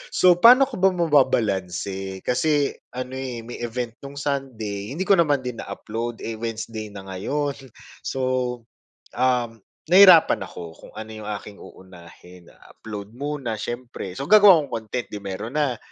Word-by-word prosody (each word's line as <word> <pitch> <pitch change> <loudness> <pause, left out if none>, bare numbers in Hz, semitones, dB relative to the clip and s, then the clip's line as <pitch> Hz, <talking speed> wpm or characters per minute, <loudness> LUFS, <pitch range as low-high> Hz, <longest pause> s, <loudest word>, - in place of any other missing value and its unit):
So 180 -1 +5
pa'no 250 +5 +8
ko 235 - -7
ba 190 +1 +5
mababalanse, 100 - 0
kasi 145 +2 +1 0.2
ano, 130 0 -5
eh, 125 -3 -5
may 120 - -8
event 120 0 -5
nung 140 +1 -9
Sunday, 125 -6 -4
hindi 185 - -1
ko 195 -2 +4
naman 145 -5 +2
din 125 -2 -5
na-upload, 115 +4 -5
eh, 115 -1 -4
Wednesday 115 -1 -5
na 100 - -8
ngayon. 140 +10 -2 0.5
So, 135 - -3 1.0
um, 120 -3 0 0.3
nahirapan 185 -3 +7
ako 85 -2 -10
kung - - -14
ano 110 0 -7
'yong 110 -1 -8
aking 100 0 -11
uunahin, 90 -1 -15 0.2
upload 105 -1 -9
muna 140 -4 -4
syempre, 120 -6 -6
so 140 - -3
gagawa 205 -5 +8
kong - - -12
content, 120 +3 -5
'di 105 - -5
meron 100 +8 -5
na, 135 -5 +1
120 Hz, 150 wpm, -23 LUFS, 105-145 Hz, 1.0 s, pa'no